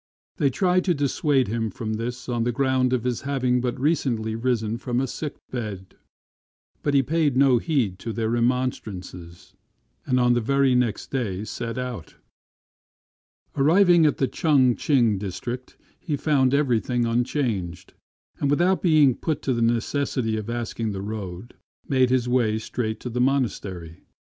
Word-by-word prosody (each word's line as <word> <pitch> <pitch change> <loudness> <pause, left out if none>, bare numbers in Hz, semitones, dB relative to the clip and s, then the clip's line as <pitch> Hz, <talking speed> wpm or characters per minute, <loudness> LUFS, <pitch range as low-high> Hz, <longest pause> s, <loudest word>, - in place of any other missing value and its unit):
They 145 -5 +2
tried 180 +5 +1
to 180 -3 +2
dissuade 140 -1 +1
him 115 +1 -2
from 110 +2 -5
this 120 +3 -5
on 120 -2 -1
the 120 - 0
ground 130 0 +1
of 125 -3 0
his 125 -2 -2
having 130 -3 0
but 125 0 -2
recently 125 -7 0
risen 115 -2 -1
from 125 -1 -2
a 135 - +1
sick 145 +3 -5 0.2
bed; 105 -7 -6 0.9
but 145 -1 0
he 135 - +5
paid 150 -2 +1
no 135 -3 +5
heed 115 - -1
to 115 - -5
their 110 0 -2
remonstrances, 105 -8 -3 0.5
and 125 -1 +2
on 125 0 +4
the 120 - +1
very 140 +2 +2
next 125 -4 0
day 105 -7 -2
set 115 +2 -5
out 125 -10 -6 1.4
Arriving 170 +3 +5
in 150 - +3
the 135 - +1
Ch'ang 130 -7 +3
ch'ing 120 -9 +2
district, 120 +6 -6 0.2
he 155 -5 -2
found 140 -3 +2
everything 125 -3 +1
unchanged; 115 - -2 0.5
and 140 - 0
without 175 +6 +2
being 155 -6 +5
put 155 +4 -3
to 130 - +1
the 115 - -1
necessity 120 0 0
of 110 0 -4
asking 115 -2 -3
the 95 0 -5
road, 100 0 -6 0.3
made 130 -2 +3
his 125 -1 +1
way 120 -4 +2
straight 110 0 -3
to 125 - -5
the 125 +1 -1
monastery. 100 -11 -1
125 Hz, 160 wpm, -24 LUFS, 110-135 Hz, 1.4 s, he